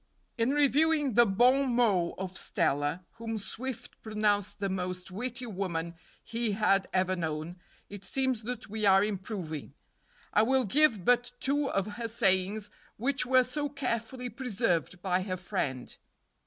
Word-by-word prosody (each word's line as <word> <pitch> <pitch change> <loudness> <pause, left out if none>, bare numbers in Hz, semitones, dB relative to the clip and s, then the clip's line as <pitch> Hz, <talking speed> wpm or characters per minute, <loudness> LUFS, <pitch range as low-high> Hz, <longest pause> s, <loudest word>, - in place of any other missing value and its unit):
In 230 +1 +1
reviewing 295 0 +3
the 240 +2 +6
bon 250 +5 +3
mots 200 -8 +2
of 185 0 -5
Stella, 145 +4 0
whom 225 -1 -4
Swift 245 +3 -6
pronounced 210 -2 0
the 200 - 0
most 180 -1 -4
witty 245 +5 -4
woman 175 -6 -3 0.3
he 230 -2 -1
had 195 -2 +2
ever 185 0 +1
known, 160 0 -4 0.3
it 200 -1 -9
seems 260 +3 +1
that 240 0 -5
we 215 +1 -4
are 195 -1 +6
improving. 185 - -4 0.6
I 210 - +5
will 260 +3 +3
give 230 - +4
but 245 0 +3
two 280 +1 +1
of 195 -1 0
her 230 -1 -2
sayings, 205 -1 +1 0.3
which 255 +2 0
were 255 0 +5
so 290 +4 -3
carefully 250 -2 -3
preserved 210 - -1
by 185 -1 +1
her 185 -1 -3
friend. 130 -8 -3
215 Hz, 145 wpm, -30 LUFS, 185-250 Hz, 0.6 s, the